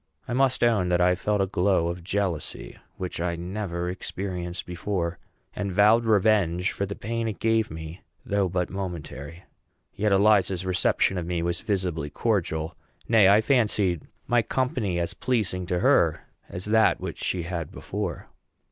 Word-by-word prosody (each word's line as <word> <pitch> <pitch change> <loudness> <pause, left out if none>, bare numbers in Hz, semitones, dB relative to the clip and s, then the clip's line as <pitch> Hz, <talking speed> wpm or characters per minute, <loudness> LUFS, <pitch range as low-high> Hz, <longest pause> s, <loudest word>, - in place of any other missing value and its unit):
I - - -3
must 130 0 +2
own 105 -7 +3
that 90 0 +2
I 90 0 +4
felt 105 +2 0
a - - +3
glow 90 -2 +1
of 85 0 -5
jealousy, 95 -3 -3 0.2
which 90 -2 -4
I 85 0 -1
never 90 0 -4
experienced 90 -1 -4
before, 90 -1 -3 0.4
and 100 -1 -2
vowed 105 +5 +5
revenge 100 -4 +3
for 100 - -3
the 100 - -5
pain 115 +1 -3
it 110 - -3
gave 110 -1 +1
me, 80 +2 -8 0.2
though 100 -5 +1
but 90 0 -1
momentary. 85 -4 -6 0.5
Yet 105 +1 0
Eliza's 95 -2 +3
reception 95 0 +1
of 85 - -5
me 85 -1 -1
was 85 +1 -1
visibly 90 -8 -2
cordial; 85 -6 -1 0.3
nay, 110 -4 +6
I 105 +2 +6
fancied 105 - +1 0.2
my 120 -1 +3
company 120 -6 -1
as 85 -1 -1
pleasing 100 -8 -1
to 90 -1 -1
her - - +3 0.3
as 90 +2 -5
that 110 +1 +3
which - - -6
she 90 -2 -1
had 85 -2 -4
before. 100 -5 -5
95 Hz, 160 wpm, -26 LUFS, 85-105 Hz, 0.5 s, nay